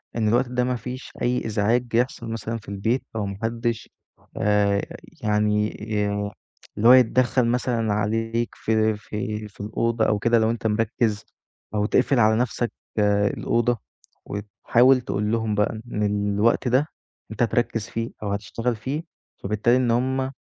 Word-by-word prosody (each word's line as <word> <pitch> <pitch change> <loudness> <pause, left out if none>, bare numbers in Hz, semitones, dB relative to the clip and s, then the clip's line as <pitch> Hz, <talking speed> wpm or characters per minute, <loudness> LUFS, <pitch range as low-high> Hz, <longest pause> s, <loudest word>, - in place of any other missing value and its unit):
إن 110 -2 +1
الوقت 120 +4 +3
ده 125 0 0
ما 125 0 0
فيش 125 +3 -7
أي 125 +1 0
إزعاج 110 +3 +1
يحصل 120 -1 0
مثلًا 115 +1 -3
في 105 - -12
البيت 105 +6 -1
أو 105 -2 -1
ما 100 -1 -5
حدش 115 0 -2 0.5
آآ 100 -1 +2 0.4
يعني 105 0 +2
ي 105 -1 -1 0.5
اللي 115 +3 +3
هو 125 - +10
يتدخّل 125 0 +4
مثلًا 115 -3 0
عليك 115 +2 -1
في 110 -1 +1
في 105 0 -5
في 100 - -13
الأوضة 110 +1 0
أو 105 - +1
كده 115 +2 +3
لو 110 0 +2
أنت 115 -1 -2
مركّز 110 0 0 0.5
أو 105 0 +1
تقفل 130 +3 +2
على 110 -1 +5
نفْسك 120 0 -1 0.3
الأوضة 105 +4 +1 0.5
وتحاول 120 +5 +2
تقول 105 -2 -2
لهم 110 -2 0
بقى 105 +1 0
إن 105 - 0 0.3
الوقت 115 +5 +2
ده 130 +5 +3 0.4
أنت 110 - -5
هتركّز 115 -1 0
فيه 115 +1 -3
أو 100 - -2
هتشتغل 115 +4 -2
فيه، 135 +9 -4 0.4
فبالتالي 105 +4 +2
إن 125 -2 +2
هُم 130 +2 0
115 Hz, 155 wpm, -24 LUFS, 105-120 Hz, 0.5 s, هو